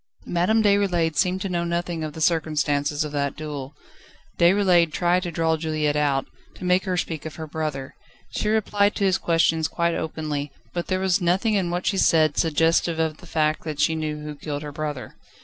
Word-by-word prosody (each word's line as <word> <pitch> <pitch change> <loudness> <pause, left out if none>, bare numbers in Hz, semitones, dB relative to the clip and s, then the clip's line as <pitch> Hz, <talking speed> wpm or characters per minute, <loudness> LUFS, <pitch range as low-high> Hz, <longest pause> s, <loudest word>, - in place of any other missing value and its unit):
Madame 200 +6 +2
Déroulède 190 -6 +2
seemed 185 +4 +1
to 195 - -2
know 175 -2 -1
nothing 170 -1 -2
of 155 -1 -4
the 160 - -8
circumstances 150 -3 +1
of 150 - -5
that 140 -1 -1
duel. 145 -3 -6 0.6
Déroulède 175 -2 +4
tried 175 +3 +2
to 180 - -4
draw 165 -1 +1
Juliette 155 -2 -1
out, 140 -2 +1 0.3
to - - -8
make 180 +2 +2
her 185 -1 -1
speak 160 -3 -3
of 160 - -7
her 160 - -6
brother. 150 -3 -4 0.4
She 210 - -1
replied 210 -1 +2
to - - -1
his 190 -2 +2
questions 165 -1 +2
quite 170 -1 0
openly, 150 -3 -3 0.2
but 175 -1 -3
there 185 -1 0
was 190 0 +1
nothing 185 +6 +2
in 190 -4 +1
what 175 +1 -2
she 195 - +1
said, 155 -3 +4
suggestive 165 +1 +2
of 160 -1 -1
the 180 - -15
fact 155 -1 0
that 155 -2 -5
she 150 +2 +3
knew 155 -1 -3
who 150 0 -5
killed 145 0 -5
her 150 - -6
brother. 150 -3 -5
160 Hz, 200 wpm, -24 LUFS, 150-180 Hz, 0.6 s, Déroulède